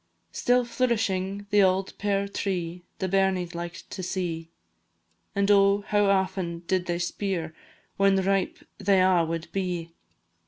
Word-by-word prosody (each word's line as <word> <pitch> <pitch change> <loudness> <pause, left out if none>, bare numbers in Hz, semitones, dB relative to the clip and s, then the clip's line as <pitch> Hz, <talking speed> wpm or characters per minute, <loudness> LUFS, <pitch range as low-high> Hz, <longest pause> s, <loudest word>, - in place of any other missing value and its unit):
Still 245 0 +2
flourishing 205 -5 -1
the 205 0 +5
auld 190 0 +2
pear 200 -1 0
tree 180 -3 -3 0.2
The 190 - -2
bairnies 190 -2 +1
liked 170 0 -6
to 190 - -5
see, 170 -3 -3 0.9
And 200 +1 +3
oh, 200 0 +5
how 205 -1 +3
aften 190 -3 0
did 185 0 0
they 175 0 0
speir 175 -2 -2 0.4
When 195 0 +4
ripe 195 0 +1 0.2
they 195 -1 +3
a' 185 -2 +4
wad 165 0 -4
be! 180 -4 -3
190 Hz, 140 wpm, -26 LUFS, 175-200 Hz, 0.9 s, the